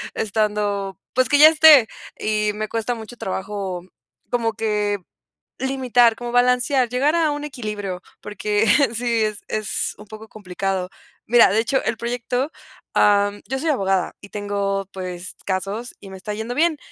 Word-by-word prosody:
estando, 205 -2 -1 0.2
pues, 255 -2 +2
que 290 - +4
ya 305 +2 +10
esté, 305 -6 +7 0.3
y 210 -1 0
me 215 0 -3
cuesta 230 +2 -2
mucho 225 +2 -9
trabajo 190 -3 -4 0.5
como 230 -2 0
que, 210 -2 -1 0.6
limitar, 250 -3 +2
como 240 0 -6
balancear, 250 +1 +3
llegar 270 +6 +1
a 325 -2 +2
un 290 0 -4
equilibrio, 210 -9 -5 0.2
porque 210 +1 -1 0.3
sí, 235 -1 +1
es 215 -1 -3
es 215 -2 -2
un 210 - -12
poco 215 +1 -11
complicado, 190 -2 -3 0.4
mira, 235 -3 +6
de 220 - +3
hecho, 260 +4 0
el 230 - -1
proyecto, 245 +4 -2 0.4
am, 205 0 +3
yo 265 +2 -2
soy 325 - -2
abogada 195 -8 0
y 200 - -13
tengo, 200 -1 -2
pues, 180 -1 -6
casos 200 +5 -3
y 195 - -11
me 190 - -8
está 210 +3 -6
yendo 220 +3 -4
bien, 320 -1 +2
215 Hz, 155 wpm, -21 LUFS, 200-245 Hz, 0.6 s, ya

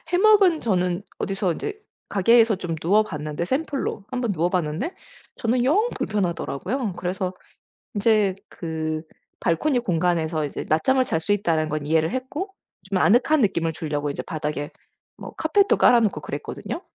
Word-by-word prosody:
해먹은 375 -2 +5
저는 180 -4 0 0.2
어디서 195 -2 -1
인제 420 - -5 0.3
가게에서 225 +2 +4
좀 175 -3 -4
누워 190 +7 +3
봤는데 150 -4 -4
샘플로 275 - -2
1 255 -1 -2
번 230 -5 0
누워 175 0 +1
봤는데 180 - -2 0.4
저는 240 +2 +1
영 395 - +3
불편하더라고요. 195 - -2
그래서 185 0 -2 0.6
인제 205 -3 +3
그 160 -2 -3 0.4
발코니 245 - +1
공간에서 165 -6 0
이제 - - -5
낮잠을 260 +12 +3
잘 165 -10 -1
수 160 - -2
있다는 160 -6 0
건 150 -1 -3
이해를 160 +2 +2
했고 290 +10 -4 0.4
좀 195 - +1
아늑한 265 +7 +4
느낌을 170 -6 +1
주려고 150 -2 -3
이제 140 - -4
바닥에 150 0 -4 0.5
뭐 - - -9
카펫도 390 +6 +3
깔아놓고 230 -5 +4
그랬거든요. 340 - -5
190 Hz, 340 characters per minute, -24 LUFS, 160-250 Hz, 0.6 s, 해먹은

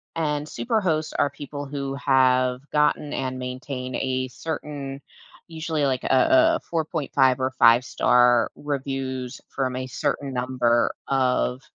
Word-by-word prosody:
and 150 -2 -1
super 225 +5 -1
hosts 155 -4 -1
are 145 - +1
people 145 0 -7
who 140 -1 -4
have 130 -2 +2
gotten 150 0 +1
and 130 -1 -3
maintain 130 0 -5
a 130 0 -1
certain, 140 -1 -6 0.5
usually 160 -2 -2
like 130 -2 -1
a 320 - +4
a - - -12
4.5 150 -5 +1
or 130 0 0
five-star 120 0 +4
reviews 135 -3 -4
from 130 -2 -2
a 130 0 -3
certain 135 +2 -2
number 125 -2 +1
of 130 -1 +1
135 Hz, 130 wpm, -24 LUFS, 130-150 Hz, 0.5 s, a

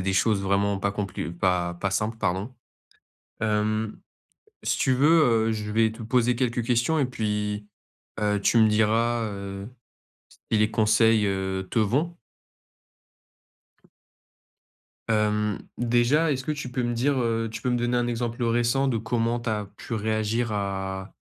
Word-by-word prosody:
a - - -2
des 95 - 0
choses 100 +1 +2
vraiment 100 +1 +1
pas 100 +1 0
complu 100 -4 -4
pas 90 -1 0
pas 95 +2 -2
simples, 110 +3 -1
pardon. 100 +4 -2 0.9
Hem, 110 0 0 0.6
si - - 0
tu 130 - +2
veux, 135 +4 +3 0.4
heu, 115 - +1
je 105 -1 -4
vais 110 0 +3
te 110 +1 -9
poser 120 +1 +2
quelques 120 -1 0
questions 125 +6 +1
et - - +3
puis, 105 -3 -2 0.5
heu, 105 -1 +1
tu 115 - +3
me 110 -1 +6
diras, 115 +2 +2
heu, 100 0 -6 0.8
si 110 - +3
les 105 +1 +2
conseils, 110 0 +3
heu, 95 -1 -2
te - - -2
vont? 140 +11 0 2.9
Hem, 105 -2 +1 0.2
déjà, 120 +7 +2
est-ce 130 -1 -2
que 155 - -2
tu 145 -4 -5
peux 130 -1 -1
me 120 0 -1
dire, 135 +4 +1
heu 115 -1 0
tu 110 - -6
peux 125 - -1
me 125 - +1
donner 120 +1 0
un 120 0 +1
exemple 120 0 -2
récent 120 +3 +2
de 120 - +1
comment 115 +1 -1
tu 115 - -4
as 105 -1 -1
pu - - -7
réagir 110 +2 -1
à 95 -1 -3
110 Hz, 160 wpm, -25 LUFS, 105-120 Hz, 2.9 s, me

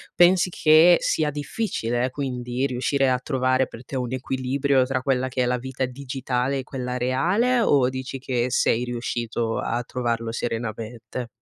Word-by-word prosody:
Pensi 180 +1 +5
che 165 +1 +6
sia 155 -2 +1
difficile 140 - -2
quindi 125 -1 -3
riuscire 130 +1 -2 0.2
a 125 - +1
trovare 130 -1 +1
per 115 - -11
te 135 - -5
un 125 -2 -3
equilibrio 130 +1 +1
tra 130 0 -1
quella 130 -1 0
che 130 -1 -1
è - - +1
la 125 0 +1
vita 130 +1 -3
digitale 130 0 -2
e - - -4
quella 125 -1 -4
reale, 180 - +2
o 140 - +3
dici 130 +1 -5
che 125 -2 -1
sei 120 -1 +2
riuscito 120 -1 -2
a 120 +1 -1
trovarlo 115 -2 -2
serenamente? 115 +1 -4
130 Hz, 160 wpm, -24 LUFS, 120-135 Hz, 0.2 s, che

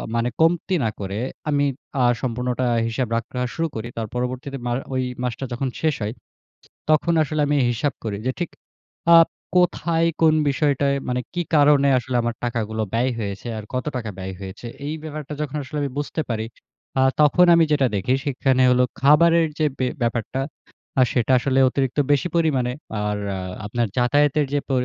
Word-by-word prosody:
মানে 115 +1 +1
কমতি 175 +3 +2
না 110 - +1
করে 100 +1 -4 0.3
আমি 145 -1 +2 0.4
আ - - +4 0.2
সম্পূর্ণটা 125 +1 -1 0.2
হিসাব 120 +2 -1
রাখা 125 +2 -4
শুরু 165 0 -1
করি। 110 +1 -4
তার 115 -1 -2
পরবর্তীতে 130 +2 -3
মা 120 - -1 0.2
ওই 130 0 0 0.2
মাসটা 125 +2 -3
যখন 130 +2 -2
শেষ 155 -2 +2
হয়। 105 +1 -2 0.8
তখন 155 +2 +3
আসলে 155 0 -2
আমি 145 - +1 0.2
হিসাব 135 +5 -1
করি 105 -3 -2
যে 130 - +1
ঠিক 175 - -2 0.7
আপ 165 - +6 0.3
কোথায় 170 -2 +2 0.2
কোন 160 -1 +6
বিষয়টায় 140 -1 +1
মানে 125 0 0
কী 175 - 0
কারণে 145 -1 +5
আসলে 125 +1 -3
আমার 120 0 -1
টাকাগুলো 110 -2 -2
ব্যয় 125 +3 +2
হয়েছে 100 0 -5
আর 105 - -7
কত 125 - -1
টাকা 115 -3 -3
ব্যয় 95 0 -5
হয়েছে। 95 +4 -8 0.2
এই 150 - -2
ব্যাপারটা 155 -2 -6
যখন 150 -1 -3
আসলে 140 +3 -6
আমি 140 - -2
বুঝতে 145 +2 -2
পারি, 110 -1 -1 0.5
আ - - +4 0.2
তখন 150 +4 +5
আমি 170 -1 +5
যেটা 140 -3 +3
দেখি 100 +7 +1
সেখানে 130 -2 +1
হলো 125 0 +4 0.2
খাবারের 165 +3 +5
যে 155 - +3
ব্যা 130 - +1
ব্যাপারটা 115 +2 -1 0.6
আ - - +7
সেটা 125 0 +1
আসলে 130 +1 0
অতিরিক্ত 135 +1 -1
বেশি 145 +5 +2
পরিমাণে। 135 -7 +1 0.3
আর 105 0 -1 0.2
আ - - -4 0.3
আপনার 120 +3 0
যাতায়াতের 145 +4 +3
যে 145 - +2
প - - -20
130 Hz, 175 wpm, -22 LUFS, 120-150 Hz, 0.8 s, আ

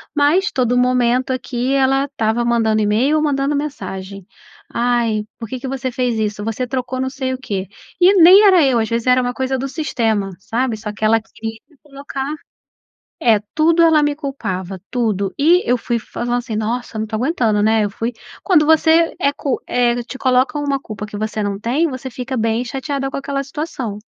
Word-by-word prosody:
mas 320 +8 +3
todo 245 -1 +1
momento 250 0 +2
aqui 255 0 -2
ela 270 0 +2
estava 235 -4 -1
mandando 225 -2 +2
e-mail 230 +9 +2
ou 305 - +1
mandando 285 -1 0
mensagem, 195 -10 -5 0.5
ai 235 -3 +1
por 230 - -7
que 255 - -5
que 265 - -6
você 260 -1 -3
fez 245 -2 -1
isso? 210 -1 -2
Você 225 +3 -2
trocou 255 0 -3
não 260 0 -1
sei 260 -1 -3
o - - -3
quê. 200 -7 -4 0.3
E 365 +3 +7
nem 375 +4 +8
era 370 -4 +6
eu, 255 -3 +2
às 220 -1 -1
vezes 230 +1 -1
era 255 0 +5
uma 245 0 -1
coisa 260 +1 -1
do 275 - -2
sistema, 225 - -1
sabe. 235 +3 -1
Só 210 0 -5
que 215 +1 -3
ela 225 0 +3
queria 225 0 -8 0.2
colocar 275 0 -6 0.9
é 220 -3 +5 0.2
tudo 330 +2 +4
ela 320 -2 +5
me 295 0 0
culpava, 195 - -5
tudo, 210 -6 -1
e 335 +6 +4
eu 245 - +3
fui 235 0 -2
falando 240 +2 -3
assim: 235 -3 -5
"Nossa 225 +1 -3
não 220 - -1
tô 220 - -4
aguentando, 230 -5 +1
né", 220 0 +3
eu 205 - -2
fui 230 +4 -4 0.3
quando 345 -6 +4
você 320 +1 +4
é 280 -5 +2
cu 275 -3 -2
eh, 245 -1 +1
te 260 - -9
coloca 255 +2 +2
uma 280 -1 -1
culpa 215 -5 -7
que 210 -1 -8
você 215 0 -2
não 200 -1 -2
tem 280 +9 0
você 260 0 -6
fica 255 +2 -5
bem 225 +1 0
chateada 270 +1 -3
com - - -4
aquela 275 0 -3
situação. 270 -7 -5
250 Hz, 195 wpm, -18 LUFS, 220-275 Hz, 0.9 s, nem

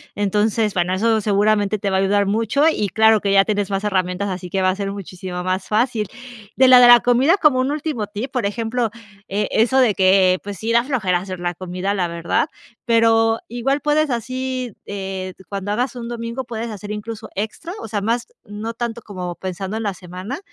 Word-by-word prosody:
Entonces, 210 +1 +1
bueno, 180 0 0
eso 220 +2 +2
seguramente 205 0 +2
te 200 - -1
va 190 - 0
a - - +3
ayudar 200 +1 +2
mucho 225 +8 +1
y 210 -10 -1
claro 220 +2 +4
que 200 - 0
ya 195 0 +5
tienes 205 -2 -1
más 195 +1 -2
herramientas, 185 0 0
así 180 -1 -5
que 190 +1 -1
va 185 - +3
a 185 - 0
ser 195 0 -3
muchísimo 185 -2 -6
más 185 +1 -2
fácil. 220 -1 +1 0.5
De 260 0 +6
la 250 -1 +9
de 245 - +8
la 240 0 +9
comida, 260 - +3
como 295 -7 +4
un 270 +2 0
último 295 -8 -3
tip, 215 +6 -5
por 250 -6 -1
ejemplo, 230 +2 -1 0.4
eh, 205 +2 -1
eso 245 +4 +3
de 230 -6 +4
que, 185 -1 +4
pues, 200 -2 -6
sí, 225 +4 -2
da 235 0 +4
flojera 215 -10 0
hacer 185 -1 -7
la 175 0 -2
comida, 185 +2 -3
la 180 -4 -1
verdad, 170 - -1 0.3
pero 225 -1 +3
igual 255 +5 -1
puedes 300 0 +1
así, 255 0 -3
eh, 190 -2 -5
cuando 200 0 -4
hagas 250 +4 -1
un 235 -1 -6
domingo, 235 +2 -4
puedes 230 -1 -5
hacer 210 0 -7
incluso 210 +1 -6
extra, 220 - -4
o - - -7
sea, 210 -1 -2
más, 230 +4 -1 0.2
no 215 +3 -6
tanto 235 0 -4
como 180 -5 -6
pensando 190 +3 -5
en 225 - -3
la 200 -2 -1
semana 185 - -7
210 Hz, 210 wpm, -20 LUFS, 195-235 Hz, 0.5 s, la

